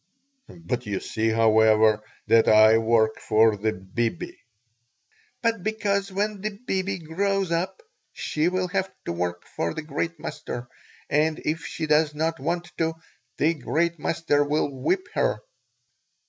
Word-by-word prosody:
"But 125 -8 -5
you 100 -2 -1
see, 110 +1 -1
however, 110 -1 +4 0.2
that 115 0 +4
I 110 +1 +7
work 110 -1 +2
for 110 0 +4
the 110 +2 0
'bibi.'" 105 +5 -3 1.1
"But 230 -4 +1
because 200 -1 -1
when 205 +1 -2
the 210 -1 -4
'bibi' 190 -2 -1
grows 190 +3 -1
up 180 - -2 0.3
she 155 +2 -1
will 185 0 -1
have 190 +1 -1
to - - -2
work 85 0 -3
for 85 - -1
the 160 - -4
great 160 +2 -3
master, 120 -4 -6 0.4
and, 155 +2 +2
if 160 +2 -2
she 160 - -4
does 150 0 +2
not 165 +2 -1
want 175 0 -2
to, 165 0 0 0.4
the 160 +3 +3
great 165 +3 -1
master 150 -2 +1
will 145 0 0
whip 150 - -1
her." - - +1
155 Hz, 145 wpm, -25 LUFS, 110-180 Hz, 1.1 s, I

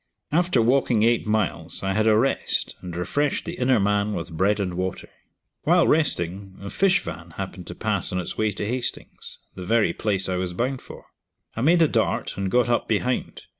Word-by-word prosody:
After 165 -6 +3
walking 120 -2 +3
eight 115 -1 +2
miles, 110 -2 -1
I 95 0 0
had 110 +2 +2
a 110 -1 +5
rest, 135 +5 0
and 90 -2 -7
refreshed 145 +12 -1
the 170 - -4
inner 125 -2 +3
man 105 +1 +1
with 85 0 -5
bread 100 +5 +2
and 95 -3 -1
water. 95 +1 -3 0.5
While 175 +2 +4
resting, 95 - 0
a 100 0 -7
fish 190 -1 +3
van - - -8
happened - - -6
to - - -7
pass - - -1
on 90 - -1
its 90 - -4
way 110 -1 +1
to 100 - -4
Hastings, 125 +3 -4 0.2
the 95 - -8
very 105 -2 +2
place 100 -3 -1
I 95 -1 -1
was 90 -1 -2
bound 125 +7 -2
for. - - -12 0.5
I 115 - -3
made 165 +5 +5
a - - +5
dart - - 0
and 95 0 -2
got 125 +4 +3
up 120 0 +1
behind. 125 +3 -1
110 Hz, 200 wpm, -24 LUFS, 95-130 Hz, 0.5 s, a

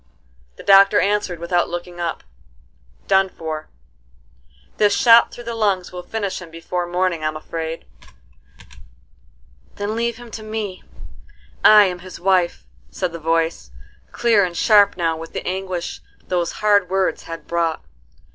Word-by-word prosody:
The - - -12
doctor 195 +1 +6
answered 205 -3 0
without 170 +1 0
looking 175 0 -6
up: 170 -1 -3 0.8
"Done 190 0 +3
for: 155 -3 -6 1.1
this 205 -1 +3
shot 230 -1 +6
through 240 - -10
the 235 0 -5
lungs 200 -5 0
will 180 0 -7
finish 200 0 -4
him 175 - -10
before 175 +2 -4
morning 175 -2 -1
I'm 155 0 -2
afraid." 160 +1 -6 1.9
"Then 205 +2 -3
leave 235 0 -1
him 240 -1 -12
to 220 - -7
me: 215 -3 -5 0.8
I 215 -1 +8
am 180 -2 -2
his 185 0 -11
wife," 180 -2 +1 0.2
said 180 -2 -3
the 170 - -7
voice, 165 - -1 0.4
clear 225 -4 +3
and 175 -2 -3
sharp 205 -3 +4
now 165 -2 0
with 165 0 -9
the - - -5
anguish 185 -2 -4 0.3
those 175 -2 -1
hard 205 -3 +2
words 190 0 0
had 165 0 -7
brought. 170 -2 -1
185 Hz, 145 wpm, -20 LUFS, 170-205 Hz, 1.9 s, I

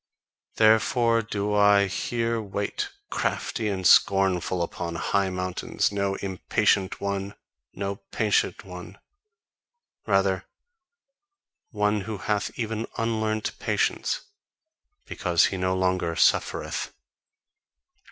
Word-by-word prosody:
Therefore 115 +1 +4
do 105 -1 -2
I 100 -1 +5
here 115 +4 -1
wait, 105 - -3 0.2
crafty 110 -3 -1
and 95 -3 -2
scornful 95 -2 +4
upon 85 0 -5
high 100 +3 0
mountains, 90 +1 -1
no 100 -1 -1
impatient 95 0 0
one, 100 0 -3 0.4
no 100 +1 -3
patient 105 -1 0
one; 90 0 -10 1.1
rather 95 -2 +2 1.2
one 105 -1 0
who 105 +1 -5
hath 105 +3 -1
even 115 -1 -3
unlearnt 110 -1 -1
patience, - - 0 0.8
because 85 -3 +2
he - - -2
no 95 0 0
longer 90 -2 0
"suffereth." - - +1
100 Hz, 95 wpm, -26 LUFS, 95-110 Hz, 1.2 s, I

